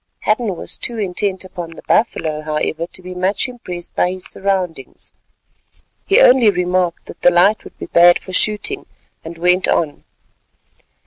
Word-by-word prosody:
Hadden 215 -2 0
was - - -5
too 235 - -2
intent 190 -1 -2
upon 175 -3 -8
the - - -13
buffalo, 155 -8 0
however, 155 +2 -2
to 185 - -7
be 180 0 -7
much 185 +6 0
impressed 180 -9 -7
by 180 - +1
his 185 -1 -8
surroundings. 185 -8 -3 1.0
He 400 +4 +5
only 250 - +6
remarked 180 -2 0
that - - -12
the - - +6
light 180 +5 +3
would - - -14
be - - -6
bad 175 0 +6
for 185 - -11
shooting, 215 - +2 0.4
and 165 +1 -9
went 180 +2 +2
on. 150 -4 -1
180 Hz, 155 wpm, -18 LUFS, 170-205 Hz, 1.0 s, only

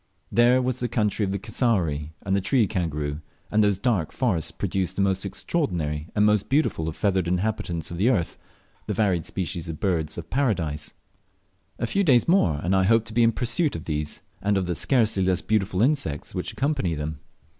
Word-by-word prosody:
There 125 +2 +4
was 130 0 -1
the 125 - 0
country 105 -2 0
of 95 - 0
the 100 - -1
cassowary 85 - 0
and 95 0 0
the 100 - +1
tree 115 +4 +3
kangaroo, 75 -6 -2 0.3
and 110 0 +4
those 100 -2 +2
dark 100 -7 0
forests 100 - 0
produced 95 -2 -2
the - - 0
most 95 -1 +1
extraordinary 85 - -2
and 105 0 +4
the 105 - +5
most 105 -2 0
beautiful 135 - +1
of 80 - -7
the - - -19
feathered 95 -4 +1
inhabitants 90 -2 -2
of 85 - -5
the 105 +7 +3
earth 90 -10 0 0.5
the - - -2
varied 95 -6 +1
species 90 -2 -4
of 80 - -6
Birds 80 -5 -1
of - - -8
Paradise. 90 - -1 0.8
A - - -1
few 200 - +1
days 130 - +4
more 165 - +3
and 90 +3 +2
I 95 - +4
hoped 115 +2 +3
to - - -9
be 120 - +3
in 115 0 +5
pursuit 125 +7 0
of 80 - -5
these, 75 -1 -3 0.2
and 100 0 +1
of 95 - 0
the 90 - -1
scarcely 110 - +2
less 95 0 +1
beautiful 100 -2 +1
insects 135 - -1
which - - -3
accompany 135 - -1
them. 75 0 -4
95 Hz, 205 wpm, -25 LUFS, 85-115 Hz, 0.8 s, the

